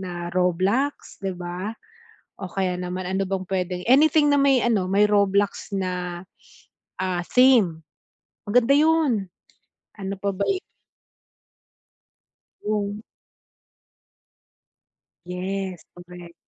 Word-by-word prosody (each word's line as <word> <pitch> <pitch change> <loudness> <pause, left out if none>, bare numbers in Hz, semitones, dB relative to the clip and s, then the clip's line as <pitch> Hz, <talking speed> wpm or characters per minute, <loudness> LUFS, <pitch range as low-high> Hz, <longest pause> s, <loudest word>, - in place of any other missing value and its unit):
na 175 -2 -5
Roblox, 185 +10 0
di 195 -1 -2
ba? 180 +4 -5 0.7
O 190 -2 -6
kaya 190 -1 -1
naman 180 +1 -4
ano 190 +1 -1
bang 190 -1 -2
puwedeng 180 -1 -2
anything 295 +2 +5
na 285 - +4
may 275 -3 +4
ano 215 -6 +1
may 205 +2 +4
Roblox 200 0 +1
na, 180 -2 -3 0.8
ah, 185 -1 -1
theme, 235 -11 +4 0.7
maganda 245 +5 +4
yun. 300 -10 +2 0.7
Ano 195 0 -4
pa 200 0 -1
ba 200 - -1
i 385 - +1 2.1
Hmm. 205 -1 -2 2.3
Yes, 185 0 -4
correct. 175 -1 -12
195 Hz, 100 wpm, -24 LUFS, 180-225 Hz, 2.3 s, anything